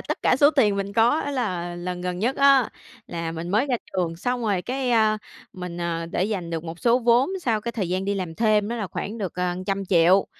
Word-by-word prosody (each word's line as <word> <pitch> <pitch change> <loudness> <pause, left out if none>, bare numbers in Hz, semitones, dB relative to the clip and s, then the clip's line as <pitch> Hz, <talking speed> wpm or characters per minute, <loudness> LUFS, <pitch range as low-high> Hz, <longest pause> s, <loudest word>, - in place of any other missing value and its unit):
tất - - -4
cả - - +4
số 285 +2 +6
tiền 220 -10 +3
mình 200 0 -3
có. 235 +8 +3
Á 285 - -3
là 185 -10 -2
lần 180 0 -4
gần 180 0 -3
nhất 240 +6 0
á, 275 -3 +5 0.4
là 165 -1 -4
mình 165 +1 -5
mới 215 +8 +2
ra 255 -3 +1 0.2
trường, 175 -3 -1
xong 245 +6 -2
rồi 200 -5 0
cái, 255 0 -2
a, 215 -2 +3 0.3
mình, 180 -2 -7
ờ, 165 -1 -2
để 175 - -1
dành 190 -5 -3
được 165 -1 -3
một 165 +1 -7
số 240 +1 +3
vốn 240 +4 +3
sau 230 -8 0
cái 235 +2 -4
thời 200 -7 -2
gian 185 +2 -1
đi 200 - 0
làm 180 -4 -4
thêm 215 -1 +2
đó 235 - -3
là 210 - -3
khoảng 215 +4 -5
được, 190 -4 -4
ờ, 180 0 -1
trăm 195 0 -1
triệu. 180 +1 +4
200 Hz, 250 wpm, -24 LUFS, 175-235 Hz, 0.4 s, số